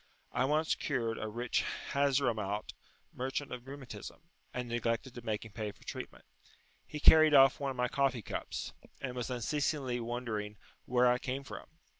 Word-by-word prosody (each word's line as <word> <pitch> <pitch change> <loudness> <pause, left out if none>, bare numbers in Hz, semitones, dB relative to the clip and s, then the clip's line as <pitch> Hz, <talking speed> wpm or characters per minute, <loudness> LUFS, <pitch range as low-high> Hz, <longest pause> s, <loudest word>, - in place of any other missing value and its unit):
I 130 - +2
once 155 +3 +2
cured 115 -6 -1
a 110 - -3
rich 120 +3 0 0.3
Hazramaut 120 -8 +1 0.4
merchant 135 +2 -3
of 125 +1 -6
rheumatism, 135 +3 -9 0.2
and 125 -1 -3
neglected 120 +1 -1
to 120 - -8
make 110 -1 -2
him 110 - -10
pay 105 -1 -3
for - - -20
treatment; - - -7 0.6
he 150 - -5
carried 155 0 +8
off 135 -1 +7
one 140 -1 -1
of 130 - -5
my 125 0 +2
coffee 130 -3 +1
cups, - - -4 0.3
and 130 -2 -4
was 125 0 -3
unceasingly 130 +1 0
wondering 115 -3 -3 0.3
where 125 0 +3
I 125 0 +4
came 135 +1 -3
from. - - -8
125 Hz, 165 wpm, -33 LUFS, 115-140 Hz, 0.6 s, carried